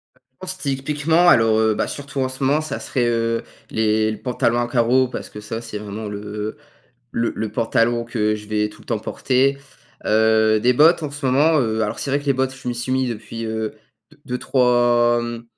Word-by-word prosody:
Heu, - - -30
je - - -49
pense 185 0 -4
typiquement, 150 +5 +2
alors, 115 -4 +5
heu, 110 -1 +2
ben, - - -1
surtout 140 -1 -6
en 130 - 0
ce 130 +1 -6
moment, 145 +4 +3
ça 155 -3 -4
serait, 125 -2 -1
heu, 115 0 0 0.3
les 110 0 +1
le 110 0 -7
pantalon 120 -1 0
à 120 - 0
carreaux 125 +2 +3
parce - - -7
que 105 - -9
ça, 115 +2 -5
c'est 110 -2 -6
vraiment 105 +1 -6
le, 100 0 -5
heu, 105 +4 -5 0.6
le 115 0 0
le 110 -1 -4
pantalon 115 +1 +1
que 105 -3 0
je 105 0 -8
vais 105 0 0
tout - - -16
le - - -22
temps 115 -3 -1
porter, 130 +5 +1 0.5
heu, 110 0 +3
des 125 +2 +4
bottes 160 +5 +5
en 145 - -3
ce 145 -1 -8
moment, 150 +5 +4
heu, 110 -2 0
alors 105 - -2
c'est 140 - -3
vrai 140 +1 +1
que 145 - -13
les 140 - +4
bottes 130 0 -1
je 130 -1 -7
m'y 120 - -1
suis 120 +2 -3
mis 130 0 +1
depuis, 115 0 -6
heu, 110 -1 -3 0.4
de - - -21
deux-trois, 120 -1 +2
hem, 120 0 -5
120 Hz, 225 wpm, -21 LUFS, 110-130 Hz, 0.6 s, alors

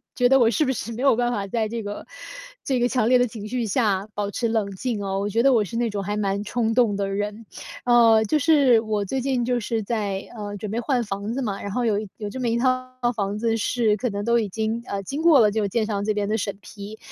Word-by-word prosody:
觉 245 -1 +3
得 270 0 +5
我 230 - +5
是 230 +6 +1
不 265 - +1
是 235 -2 -4
没 240 +4 -5
有 275 - +5
办 240 0 +1
法 205 -5 -2
在 220 +2 -1
这 230 +1 -4
个 205 0 -6 0.6
这 260 -2 0
个 240 - +3
强 245 -3 +1
烈 255 - +6
的 245 0 +2
情 215 -2 -8
绪 245 0 -1
下 205 -3 0
保 205 -1 -2
持 235 - -1
冷 220 -3 -1
静 210 +2 -3
啊， 195 -1 -2
我 200 - -1
觉 225 +3 +1
得 275 - +5
我 225 -5 +3
是 200 - -8
那 235 0 0
种 205 -1 -3
还 205 +2 -3
蛮 200 -1 -1
冲 225 0 0
动 230 -4 +3
的 195 0 -2
人。 205 +3 -4 0.4
呃， 230 -2 +5
就 300 +8 +1
是 280 -6 +5
我 215 -2 -1
最 265 +7 -2
近 260 -1 0
就 245 0 0
是 225 0 -2
在， 200 -3 -2
呃， 205 -1 -5
准 205 0 -6
备 225 - -1
换 245 0 0
房 205 +1 -4
子 270 - -2
嘛， 205 -6 -3
然 200 - -5
后 250 - 0
有 215 -3 +1 0.2
有 210 -1 -5
这 260 - -7
么 250 - -1
一 230 0 +1
套 255 +1 0 0.3
房 200 -1 -2
子 225 +1 0
是 220 -1 +1
可 245 +4 -1
能 200 -1 -4
都 235 +2 +2
已 220 - -1
经 220 +3 -2
呃， 200 0 -3
经 280 +9 -4
过 325 -4 +6
了 215 -3 +5
这 220 - -1
个 205 - 0
建 220 +2 0
商 205 -2 -2
这 215 - +1
边 205 -1 -2
的 220 - +1
审 200 -2 -3
批。 205 +2 -10
220 Hz, 295 characters per minute, -23 LUFS, 205-245 Hz, 0.6 s, 烈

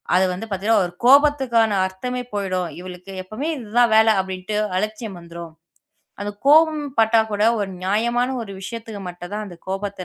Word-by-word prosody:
அது 185 +1 +4
வந்து 190 +5 -6
பாத்தீங்கன்னா 200 +1 +2
ஒரு 175 - -7
கோபத்துக்கான 265 -5 +5 0.2
அர்த்தமே 250 +7 -4
போயிடும். 185 -3 -2
"இவளுக்கு 185 +1 -10
எப்பவுமே 235 - -4
இது 225 -5 -9
தான் 235 -2 +5
வேலை." 220 0 +6
அப்படின்னு 190 +2 -5 0.2
அலட்சியம் 215 -1 -4
வந்துரும். 170 -1 -10 0.7
அந்தக் 205 0 -6
கோவம்பட்டா 290 -8 +4
கூட 205 0 0 0.2
ஒரு 195 -1 -2
நியாயமான 235 +6 +1
ஒரு 200 -3 -8
விஷயத்துக்கு 220 0 -7
மட்டும் 175 +1 -9
தான் 215 0 -3
அந்தக் 175 -3 -13
கோபத்தை 195 -1 -4
210 Hz, 155 wpm, -21 LUFS, 190-235 Hz, 0.7 s, வேலை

